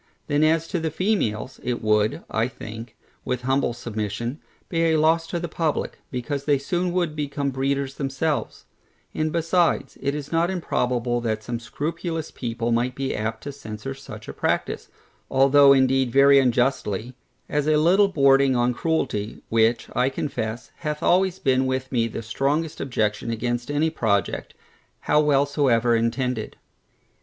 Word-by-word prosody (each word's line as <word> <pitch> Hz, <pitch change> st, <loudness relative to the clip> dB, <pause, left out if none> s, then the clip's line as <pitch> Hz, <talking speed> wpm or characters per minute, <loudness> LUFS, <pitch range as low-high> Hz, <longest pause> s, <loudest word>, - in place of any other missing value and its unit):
Then 145 Hz, 0 st, +1 dB
as 160 Hz, +1 st, +2 dB
to 180 Hz, -, -1 dB
the 160 Hz, 0 st, -1 dB
females, 155 Hz, -, -1 dB
it 120 Hz, -2 st, -3 dB
would, 105 Hz, 0 st, +2 dB
I 110 Hz, +1 st, 0 dB
think, 115 Hz, -1 st, -9 dB, 0.3 s
with 125 Hz, -1 st, -3 dB
humble 135 Hz, 0 st, +1 dB
submission, 115 Hz, +2 st, -4 dB, 0.3 s
be 165 Hz, -1 st, 0 dB
a 160 Hz, -1 st, +3 dB
loss 165 Hz, +2 st, +3 dB
to 175 Hz, -, -3 dB
the 175 Hz, -, -3 dB
publick, 160 Hz, -2 st, -2 dB
because 140 Hz, +2 st, -4 dB
they 145 Hz, -2 st, +3 dB
soon 175 Hz, +6 st, -1 dB
would 175 Hz, -4 st, 0 dB
become 145 Hz, -1 st, -2 dB
breeders 135 Hz, +1 st, -1 dB
themselves: 140 Hz, +2 st, -2 dB, 0.5 s
and 155 Hz, 0 st, -1 dB
besides, 170 Hz, +1 st, +1 dB
it 140 Hz, +1 st, -1 dB
is 150 Hz, -1 st, -6 dB
not 165 Hz, +1 st, +2 dB
improbable 125 Hz, -9 st, -1 dB
that 110 Hz, -2 st, -2 dB
some 120 Hz, 0 st, -4 dB
scrupulous 160 Hz, +6 st, -4 dB
people 115 Hz, -1 st, -3 dB
might 120 Hz, +2 st, +1 dB
be 135 Hz, -1 st, -2 dB
apt 110 Hz, +1 st, -3 dB
to 145 Hz, -, -5 dB
censure 110 Hz, -1 st, -7 dB
such 135 Hz, -, -11 dB
a -, -, -6 dB
practice, -, -, -1 dB, 0.4 s
(although 140 Hz, +1 st, +6 dB
indeed 130 Hz, -1 st, +3 dB
very 140 Hz, +2 st, +6 dB
unjustly) 125 Hz, -3 st, 0 dB, 0.3 s
as 150 Hz, 0 st, -1 dB
a 155 Hz, -1 st, +4 dB
little 185 Hz, +6 st, +5 dB
bordering 140 Hz, -6 st, +4 dB
upon 120 Hz, 0 st, +2 dB
cruelty, 125 Hz, -, -2 dB
which, 115 Hz, +1 st, +2 dB
I 125 Hz, +2 st, +3 dB
confess, 125 Hz, -5 st, -4 dB
hath 150 Hz, -2 st, -4 dB
always 185 Hz, 0 st, +3 dB
been 130 Hz, -3 st, +2 dB
with 130 Hz, 0 st, -2 dB
me 115 Hz, -2 st, +1 dB
the 115 Hz, 0 st, -6 dB
strongest 145 Hz, +8 st, -1 dB
objection 110 Hz, -4 st, -1 dB
against 120 Hz, +2 st, -2 dB
any 150 Hz, +2 st, +1 dB
project, 100 Hz, -9 st, -1 dB, 0.5 s
how 150 Hz, -, +3 dB
well 145 Hz, -2 st, +3 dB
soever 125 Hz, -5 st, +2 dB
intended. 115 Hz, 0 st, -1 dB
135 Hz, 155 wpm, -24 LUFS, 120-155 Hz, 0.5 s, although